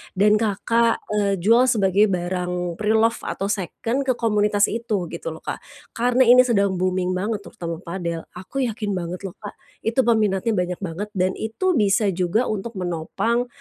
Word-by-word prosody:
dan 210 Hz, +2 st, +4 dB
Kakak, 230 Hz, +2 st, +1 dB
eee, 205 Hz, -2 st, +1 dB
jual 230 Hz, +8 st, +4 dB
sebagai 205 Hz, -3 st, +3 dB
barang 180 Hz, -1 st, -2 dB
preloved 220 Hz, +2 st, +2 dB
atau 195 Hz, -, -2 dB
seken 225 Hz, +7 st, -2 dB
ke 255 Hz, -, +2 dB
komunitas 210 Hz, -3 st, +2 dB
itu, 220 Hz, -5 st, -2 dB
gitu -, -, -7 dB
loh -, -, -14 dB
Kak. -, -, -4 dB, 0.4 s
Karena 245 Hz, +2 st, +3 dB
ini 250 Hz, +1 st, +7 dB
sedang 200 Hz, -5 st, +1 dB
booming 185 Hz, 0 st, 0 dB
banget 200 Hz, +3 st, -2 dB
terutama 170 Hz, -4 st, -6 dB
padel, 170 Hz, -2 st, -4 dB
aku 190 Hz, +10 st, -4 dB
yakin 215 Hz, -2 st, -3 dB
banget 175 Hz, 0 st, -4 dB
loh 180 Hz, -, -11 dB
Kak, 205 Hz, -, -9 dB, 0.3 s
itu 225 Hz, +4 st, 0 dB
peminatnya 220 Hz, -3 st, +2 dB
banyak 180 Hz, -1 st, -1 dB
banget 195 Hz, +2 st, -5 dB
dan 185 Hz, -2 st, +1 dB
itu 350 Hz, -, -1 dB
bisa 205 Hz, -2 st, +3 dB
juga 185 Hz, +7 st, 0 dB
untuk 215 Hz, +2 st, -3 dB
menopang, 180 Hz, +8 st, -1 dB
205 Hz, 165 wpm, -22 LUFS, 185-230 Hz, 0.4 s, ini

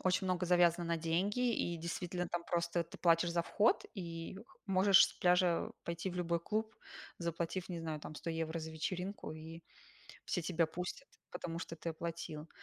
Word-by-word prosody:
очень 185 Hz, +1 st, +2 dB
много 180 Hz, -1 st, +1 dB
завязано 175 Hz, -1 st, +4 dB
на 170 Hz, 0 st, +1 dB
деньги, 195 Hz, +10 st, +1 dB
и, 175 Hz, -4 st, -1 dB
действительно, 175 Hz, +2 st, -3 dB
там 175 Hz, 0 st, -2 dB
просто 170 Hz, 0 st, 0 dB
ты 165 Hz, -, -12 dB
платишь 170 Hz, 0 st, +4 dB
за 170 Hz, 0 st, +1 dB
вход, 210 Hz, +6 st, +3 dB
и 170 Hz, -2 st, -5 dB, 0.3 s
можешь 195 Hz, 0 st, +7 dB
с -, -, -8 dB
пляжа 180 Hz, -1 st, +3 dB
пойти 170 Hz, +2 st, -3 dB
в 180 Hz, -, -6 dB
любой 170 Hz, -1 st, +1 dB
клуб, 220 Hz, +5 st, -2 dB, 0.4 s
заплатив, 170 Hz, +1 st, -2 dB
не 175 Hz, -2 st, -3 dB
знаю, 160 Hz, -2 st, -3 dB
там 155 Hz, -, -7 dB
100 165 Hz, -, -4 dB
евро 165 Hz, 0 st, -2 dB
за 160 Hz, 0 st, -5 dB
вечеринку, 180 Hz, +3 st, -3 dB
и 160 Hz, +1 st, -9 dB, 0.6 s
все 180 Hz, -, -1 dB
тебя 165 Hz, 0 st, +2 dB
пустят, 180 Hz, +11 st, -5 dB, 0.2 s
потому 170 Hz, -1 st, -4 dB
что 165 Hz, -, -6 dB
ты 165 Hz, +1 st, -3 dB
оплатил. 165 Hz, -1 st, -5 dB
170 Hz, 175 wpm, -36 LUFS, 165-180 Hz, 0.6 s, можешь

